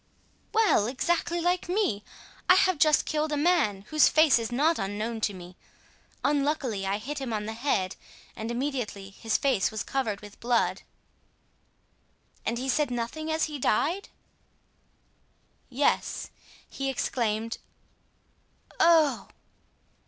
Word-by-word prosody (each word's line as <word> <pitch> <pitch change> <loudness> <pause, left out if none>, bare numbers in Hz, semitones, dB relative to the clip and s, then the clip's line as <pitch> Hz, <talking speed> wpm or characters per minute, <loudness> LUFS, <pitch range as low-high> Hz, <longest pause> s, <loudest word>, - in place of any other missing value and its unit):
"Well! 430 - +3
exactly 340 +6 0
like 355 +1 0
me! 355 - 0 0.5
I 365 - +9
have 370 -4 +3
just 305 0 +4
killed 305 0 -1
a 295 - 0
man 290 - +2
whose 310 -1 +5
face 310 -5 +5
is 230 +1 -4
not 305 +7 +2
unknown 215 +3 -3
to 205 - 0
me. 180 0 -11 0.7
Unluckily, 280 -8 0
I 195 +1 0
hit 280 +7 -5
him 265 -3 -4
on 210 -1 -2
the 220 - -4
head 220 -7 -1 0.4
and 220 0 -5
immediately 235 -6 -3
his 225 +3 -1
face 265 -9 +1
was 220 -1 -4
covered 225 -7 -2
with 205 -1 -13
blood." 240 0 +1 1.7
"And 230 +2 0
he 260 +2 -4
said 290 +2 +1
nothing 245 +7 -3
as 315 0 0
he 300 -2 -3
died?" 325 - 0 1.6
"Yes; 275 +3 0 0.4
he 275 0 -3
exclaimed, 230 -3 -1 1.2
'Oh! 325 -3 +4
265 Hz, 130 wpm, -27 LUFS, 220-310 Hz, 1.7 s, I